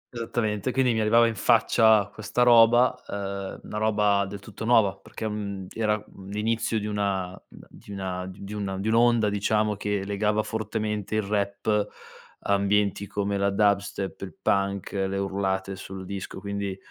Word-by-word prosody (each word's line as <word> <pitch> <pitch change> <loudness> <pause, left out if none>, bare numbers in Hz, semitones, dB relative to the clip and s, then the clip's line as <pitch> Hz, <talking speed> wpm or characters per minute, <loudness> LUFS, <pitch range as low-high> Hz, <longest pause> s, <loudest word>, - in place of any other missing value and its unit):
Esattamente, 115 -1 -1
quindi 130 -2 +2
mi 110 - 0
arrivava 115 +2 +5
in 115 - +1
faccia 110 -1 +4
questa 110 +3 0
roba, 120 +1 +6
uhm, 100 -1 -5
una 105 - -6
roba 105 -2 +2
del 100 +1 -7
tutto 100 +2 -10
nuova 110 -4 +4
perché, 110 +3 -7
mhmm, 100 -3 -5
era, 110 -1 +1
mhmm, 95 0 -13
l'inizio 110 +2 -1
di 105 - -5
una 100 -3 -1
di - - -15
una 95 -2 -4
di 95 +2 -9
una 100 -2 -3
d - - -5
dun 95 - -4
di 105 - -3
un'onda 115 -1 +4
diciamo 105 +1 +1
che 100 -1 -2
legava 105 +1 0
fortemente 110 -1 -3
il 110 - +1
rap, 100 +1 0 0.5
ambienti 100 0 +1
come 100 0 -2
la 100 0 +2
dubstep, 100 -1 0
il 95 -5 -7
punk, 100 -1 0
le 95 0 -1
urlate 95 0 -2
sul 95 0 -8
disco 95 0 -6
quindi, 100 -1 -4
100 Hz, 165 wpm, -26 LUFS, 100-110 Hz, 0.5 s, roba